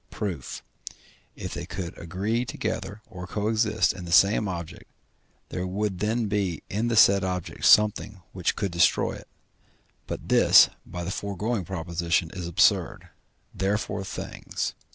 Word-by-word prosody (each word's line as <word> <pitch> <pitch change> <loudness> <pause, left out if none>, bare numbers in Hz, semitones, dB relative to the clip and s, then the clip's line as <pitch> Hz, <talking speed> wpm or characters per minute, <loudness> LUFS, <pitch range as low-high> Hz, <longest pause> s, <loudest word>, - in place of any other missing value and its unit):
Proof. 90 - -5 0.7
If - - -6
they - - -6
could 90 -3 -6
agree 100 +8 -2
together 110 -3 -4
or 90 -4 -8
co 105 +3 -2
exist 110 -1 +2
in 90 - -8
the 85 - -7
same 100 +4 +5
object, 85 -3 -7 0.6
there 90 +1 -3
would 95 0 -2
then 110 +3 0
be 100 -6 -1
in 110 +4 0
the 115 - 0
said 100 -3 +6
object 90 -2 -3
something 105 -2 +4
which 90 -2 -1
could 100 -3 -2
destroy 85 +1 +3
it; - - -10 0.8
but - - -6
this, - - +7 0.2
by 90 -1 -6
the 90 - -4
foregoing 100 +1 -3
proposition, 85 -1 -1
is 90 -3 -5
absurd, 85 - +2 0.4
therefore 100 0 -1
things, 95 - -4
&c. - - -35
95 Hz, 150 wpm, -26 LUFS, 90-105 Hz, 0.8 s, this